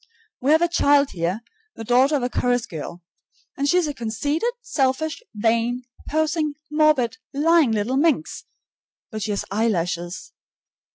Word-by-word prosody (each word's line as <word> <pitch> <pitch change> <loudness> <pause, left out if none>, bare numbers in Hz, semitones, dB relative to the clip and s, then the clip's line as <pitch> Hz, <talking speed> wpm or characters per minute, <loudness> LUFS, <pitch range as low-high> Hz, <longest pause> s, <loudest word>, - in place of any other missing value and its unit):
We 265 - 0
have 320 +2 +5
a - - +4
child 285 -4 +3
here, 175 +5 -2 0.3
the - - -7
daughter 255 +6 +3
of 270 - 0
a 245 - 0
chorus 245 -1 +1
girl, 170 +2 -8 0.5
and 280 +1 0
she 360 - +4
is 360 - +3
a 295 - -3
conceited, 285 - -1
selfish, 310 - -1
vain, 230 +3 +1 0.3
posing, 310 -1 0 0.2
morbid, 300 -7 +2 0.2
lying 315 -2 +4
little 220 +5 0
minx, 315 +1 0 0.7
but 215 -1 -5
she 210 - -3
has 205 - -2
eyelashes! 180 -5 -2
260 Hz, 150 wpm, -23 LUFS, 220-305 Hz, 0.7 s, have